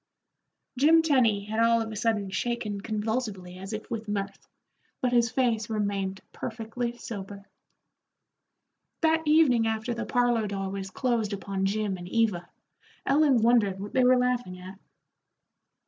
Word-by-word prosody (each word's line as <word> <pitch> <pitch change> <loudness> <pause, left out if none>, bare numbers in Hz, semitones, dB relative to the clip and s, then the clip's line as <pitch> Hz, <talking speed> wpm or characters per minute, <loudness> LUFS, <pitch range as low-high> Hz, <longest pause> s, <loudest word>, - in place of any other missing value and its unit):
Jim 320 +4 +6
Tenny 235 -10 +3
had 220 +2 -3
all 230 0 +4
of 225 -1 -3
a - - -6
sudden 210 -3 0
shaken 215 -1 -2
convulsively 210 -4 -3
as 195 +2 -7
if 215 -1 -5
with 225 -1 -4
mirth, 200 -1 -4 0.5
but 250 - 0
his 235 -1 +4
face 230 -3 0
remained 200 -3 -2
perfectly 235 +1 -4
sober. 200 -4 -8 1.6
That 320 0 +3
evening 280 -8 +4
after 220 +2 -2
the 235 0 -4
parlor 240 -3 +2
door 195 -1 -3
was 195 -1 -5
closed 225 0 -1
upon 195 -1 -2
Jim 205 -1 -1
and 175 0 -9
Eva, 210 -6 0 0.6
Ellen 275 -5 +4
wondered 220 -5 +3
what 205 +1 -7
they 260 - +3
were 255 0 +5
laughing 245 -7 -1
at. 185 +2 -11
220 Hz, 145 wpm, -27 LUFS, 200-240 Hz, 1.6 s, Jim